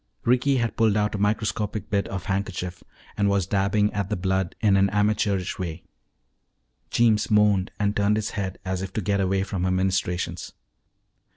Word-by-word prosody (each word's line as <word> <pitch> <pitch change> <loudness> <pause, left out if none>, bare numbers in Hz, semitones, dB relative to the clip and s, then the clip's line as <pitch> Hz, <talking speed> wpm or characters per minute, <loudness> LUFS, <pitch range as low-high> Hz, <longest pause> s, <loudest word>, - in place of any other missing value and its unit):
Ricky 125 +3 +3
had 120 -2 -1
pulled 110 -2 +3
out 105 0 +1
a 105 - -3
microscopic 105 0 -1
bit 100 -1 +1
of 95 -2 -5
handkerchief 95 -2 -3 0.3
and 100 -1 +2
was 100 -2 +1
dabbing 100 +2 +1
at 100 -2 -2
the 105 - 0
blood 95 -1 -1
in 105 -3 +3
an 100 0 +4
amateurish 105 -2 0
way. 85 -2 -5 1.1
Jeems 115 -3 +2
moaned 105 -3 +3
and 105 0 +1
turned 100 +1 +2
his 110 -1 -2
head 95 -3 -4
as 95 0 -2
if 95 -1 -5
to 110 - -1
get 100 +1 0
away 95 0 +1
from 95 -2 -3
her 95 - +1
ministrations. 95 -1 -1
100 Hz, 175 wpm, -25 LUFS, 95-105 Hz, 1.1 s, an